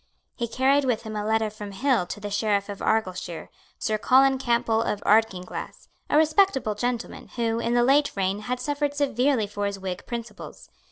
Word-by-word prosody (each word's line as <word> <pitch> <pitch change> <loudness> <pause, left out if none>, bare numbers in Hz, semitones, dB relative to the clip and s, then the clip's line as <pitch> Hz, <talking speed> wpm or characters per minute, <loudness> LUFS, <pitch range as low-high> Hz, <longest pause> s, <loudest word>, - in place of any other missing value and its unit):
He 235 - -2
carried 265 +5 +2
with 245 -4 0
him 220 -1 -6
a 210 - -2
letter 220 0 +1
from 210 -1 -8
Hill 245 -4 +1
to 205 - -6
the 205 0 -6
Sheriff 205 -1 0
of 200 - -6
Argyleshire, 185 -6 -2 0.3
Sir 215 -1 -1
Colin 265 +3 +4
Campbell 235 -3 +1
of 210 - -1
Ardkinglass, 205 -4 0 0.2
a - - +3
respectable 310 - +3
gentleman, 240 +2 -3
who, 230 -1 0
in 235 +1 0
the 240 - +4
late 285 +3 +3
reign, 195 0 0
had 245 +4 -3
suffered 290 0 -2
severely 270 -4 +1
for 205 0 -3
his 200 0 -4
Whig 185 -2 -6
principles. 235 -1 -8
225 Hz, 180 wpm, -25 LUFS, 205-260 Hz, 0.3 s, Colin